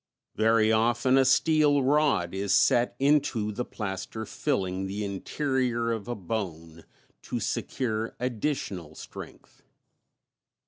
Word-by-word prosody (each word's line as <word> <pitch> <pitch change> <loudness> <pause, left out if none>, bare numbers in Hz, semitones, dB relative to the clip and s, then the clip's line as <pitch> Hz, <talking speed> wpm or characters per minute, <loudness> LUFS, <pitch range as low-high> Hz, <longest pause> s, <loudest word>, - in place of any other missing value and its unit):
Very 110 0 +3
often 120 +3 +3
a 135 - +6
steel 145 +1 +3
rod 135 - +2
is 100 0 +1
set 120 0 +3
into 135 -6 +2
the 115 +4 -3
plaster 105 0 -5
filling 95 -11 -2
the 100 +2 -3
interior 120 +3 -1
of 110 -3 -4
a 120 - -3
bone, 85 -5 -5 0.4
to - - -4
secure 115 -3 -2
additional 110 - -3
strength. - - -11
115 Hz, 110 wpm, -27 LUFS, 100-130 Hz, 0.4 s, a